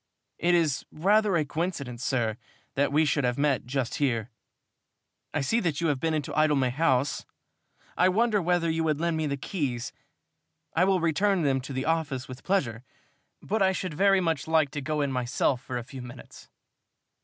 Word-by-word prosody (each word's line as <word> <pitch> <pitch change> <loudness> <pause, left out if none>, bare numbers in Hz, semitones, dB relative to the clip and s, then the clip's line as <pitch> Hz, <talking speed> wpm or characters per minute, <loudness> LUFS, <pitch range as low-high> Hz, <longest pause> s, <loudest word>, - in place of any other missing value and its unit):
"It 175 +1 +3
is 160 -5 +1
rather 205 +4 +2
a 155 - +1
coincidence, 140 -6 -3
sir, 120 -4 0 0.4
that 140 0 +1
we 155 +2 +3
should 145 0 +1
have 125 -1 0
met 140 -4 +1
just 130 -2 -2
here. 120 -4 0 1.0
I 145 - -1
see 145 - +1
that 165 -9 -1
you 170 -1 +1
have 140 -3 0
been 160 +1 0
into 150 -2 -3
Idlemay 145 -4 +2
House. 135 -1 +1 0.7
I 185 - +4
wonder 215 +1 +2
whether 175 -1 +1
you 160 0 0
would 155 -2 0
lend 170 0 0
me 160 -1 -1
the 140 -1 -2
keys? 135 -6 -3 0.8
I 175 +3 +3
will 190 -2 +2
return 175 +3 +2
them 135 -2 +1
to 140 - -8
the 130 0 -2
office, 155 -5 -1
with 130 0 -10
pleasure, 125 - 0 0.6
but 215 +1 -1
I 190 0 +4
should 185 -3 -3
very 195 +4 +4
much 165 -5 -1
like 160 -3 +2
to 145 - -4
go 150 +2 -1
in 140 -1 0
myself 125 0 0
for 130 -2 -5
a 120 - -4
few 130 +2 -9
minutes." 125 +1 -12
150 Hz, 190 wpm, -27 LUFS, 130-170 Hz, 1.0 s, I